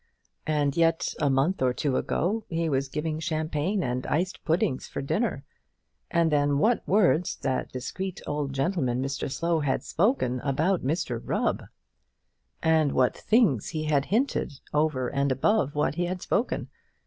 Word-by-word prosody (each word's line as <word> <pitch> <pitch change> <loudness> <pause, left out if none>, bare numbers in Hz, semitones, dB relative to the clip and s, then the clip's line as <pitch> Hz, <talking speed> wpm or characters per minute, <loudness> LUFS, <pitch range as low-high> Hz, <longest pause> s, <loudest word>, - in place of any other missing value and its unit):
And 145 -2 +1
yet 165 -1 +2
a 145 - +2
month 135 +7 +1
or 125 -1 +3
two 135 +1 0
ago 210 +12 0
he 165 -1 -1
was 135 -2 0
giving 155 +2 -2
champagne 160 +3 -1
and 125 0 -2
iced 175 +6 -1
puddings 160 -5 0
for - - -5
dinner! 140 - -1 0.7
And 170 -1 +2
then 145 -1 +2
what 225 +10 +3
words 180 -4 +3
that 130 -1 -1
discreet 185 +9 -5
old 145 -1 -2
gentleman, 135 -3 0
Mr 135 0 -3
Slow, 170 +2 0
had 140 -3 0
spoken 165 - +1
about 155 +8 +1
Mr 130 -5 -1
Rubb, - - -1 1.0
and 160 -3 +3
what 125 -1 +2
things 215 - +2
he 155 -2 -3
had 145 -2 +1
hinted 230 - 0 0.2
over 150 -4 +1
and 140 +2 0
above 145 - +1
what 150 - +1
he 175 +3 -1
had 180 +1 -3
spoken! 235 - -1
155 Hz, 155 wpm, -27 LUFS, 135-175 Hz, 1.0 s, or